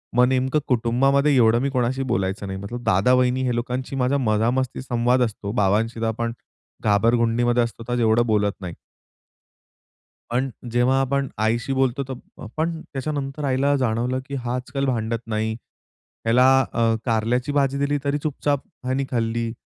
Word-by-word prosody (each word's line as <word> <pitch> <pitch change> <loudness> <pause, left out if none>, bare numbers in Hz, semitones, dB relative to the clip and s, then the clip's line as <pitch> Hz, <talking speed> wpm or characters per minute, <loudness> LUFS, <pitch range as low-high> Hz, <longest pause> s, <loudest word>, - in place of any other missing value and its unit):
मग 125 +1 +6
नेमकं 130 +3 +1
कुटुंबामध्ये 135 +4 +2
एवढं 115 -1 +4
मी 140 - 0
कोणाशी 130 0 0
बोलायचं 95 -2 -1
नाही. 95 0 -5
मतलब 120 +5 -6
दादा-वहिनी 125 +6 +3
हे 125 -2 0
लोकांशी 125 +3 -3
माझा 130 +1 +1
मजामस्ती 120 +2 0
संवाद 125 0 +1
असतो. 105 -3 -3
बाबांशी 110 +2 +1
तर - - 0
आपण 115 +1 -2 0.5
घाबरगुंडीमध्ये 115 +3 +2
असतो. 115 0 -6
तर 120 0 0
एवढं 115 +1 +3
बोलत 105 -2 +2
नाही. 90 -2 -6 1.6
पण 130 +3 0 0.2
जेव्हा 125 +2 +3
आपण 135 +1 0
आईशी 115 +4 0
बोलतो, 130 0 +1
तो 135 0 -6 0.4
पण 160 +1 -1
त्याच्यानंतर 140 +1 -4
आईला 140 +2 +2
जाणवलं, 125 0 0
की 140 0 -6
हा 125 -1 -3
आजकाल 130 +2 -3
भांडत 115 -3 -1
नाही. 110 0 -1 0.7
ह्याला 120 +3 +4 0.3
अ, 115 -1 +2
कारल्याची 120 +3 0
भाजी 140 -1 +1
दिली 140 +1 0
तरी 140 0 0
चुपचाप 145 -1 -1 0.2
हयानी 130 +2 0
खाल्ली. 115 -1 -1
125 Hz, 150 wpm, -23 LUFS, 115-135 Hz, 1.6 s, मग